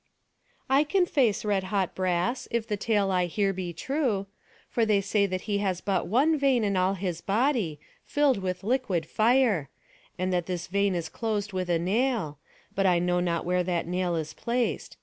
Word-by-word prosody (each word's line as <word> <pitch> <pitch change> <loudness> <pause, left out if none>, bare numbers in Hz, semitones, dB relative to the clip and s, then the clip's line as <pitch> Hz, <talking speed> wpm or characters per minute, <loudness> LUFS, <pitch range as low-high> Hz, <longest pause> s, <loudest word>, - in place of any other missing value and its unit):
"I 270 +2 +4
can 360 +4 +2
face 245 - +1
red 200 -2 +1
hot 190 -1 -1
brass, 185 +6 -1
if 230 -1 -1
the 210 - -1
tale 205 -1 +1
I 180 -1 +1
hear 195 +3 0
be 180 -2 -4
true. 235 - -1 0.4
For 235 - 0
they 215 -2 +3
say 200 +1 +1
that 185 -1 -3
he 205 -1 -1
has 190 -3 -1
but 190 -2 -1
one 285 - +3
vein 265 -4 +3
in 200 -2 0
all 185 +1 +2
his 180 -3 -3
body, 210 - 0 0.2
filled 290 -6 +2
with 185 0 -3
liquid 220 -8 0
fire; 220 - +2 0.5
and 185 +1 -1
that 175 -2 0
this 180 -2 -3
vein 200 0 +1
is 170 -2 -2
closed 215 0 -3
with 185 -1 -2
a 170 - +3
nail; 190 - 0 0.3
but 195 0 +2
I 180 -1 +4
know 180 +1 +1
not 170 -2 -1
where 180 +1 +1
that 175 -1 -1
nail 180 0 -1
is 155 -2 -3
placed. 240 0 -2
195 Hz, 190 wpm, -27 LUFS, 180-230 Hz, 0.5 s, I